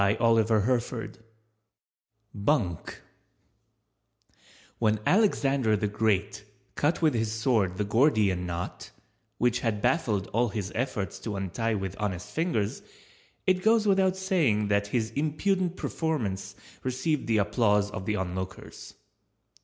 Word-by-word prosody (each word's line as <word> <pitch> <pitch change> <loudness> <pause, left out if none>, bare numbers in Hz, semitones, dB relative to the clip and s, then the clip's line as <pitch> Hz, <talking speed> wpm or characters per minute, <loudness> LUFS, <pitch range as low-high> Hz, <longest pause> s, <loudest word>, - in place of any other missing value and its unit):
BUNK 100 - -1 1.8
When 110 -2 +2
Alexander 140 - +3
the 105 - -1
Great 105 -1 0 0.3
cut 155 +4 0
with 155 -3 +4
his 110 -2 0
sword 110 -5 +1
the 105 - 0
Gordian 105 - +2
Knot, 85 +1 -5 0.5
which 120 0 +2
had 110 -3 -1
baffled 105 - +1
all 120 +2 +2
his 100 -1 -4
efforts 105 -7 -3
to 105 +1 -5
untie 110 +4 -1
with 95 -1 -4
honest 95 -4 -3
fingers, 155 - -1 0.6
it 185 -1 +2
goes 220 +1 +4
without 190 -2 +3
saying 150 - +1
that 100 0 +1
his 110 0 -1
impudent 175 - 0
performance 125 - -2 0.3
received 135 +3 -1
the 115 -1 +2
applause 105 -1 +2
of 100 -3 -6
the 105 - +1
onlookers. 95 0 -6
110 Hz, 115 wpm, -28 LUFS, 100-145 Hz, 1.8 s, with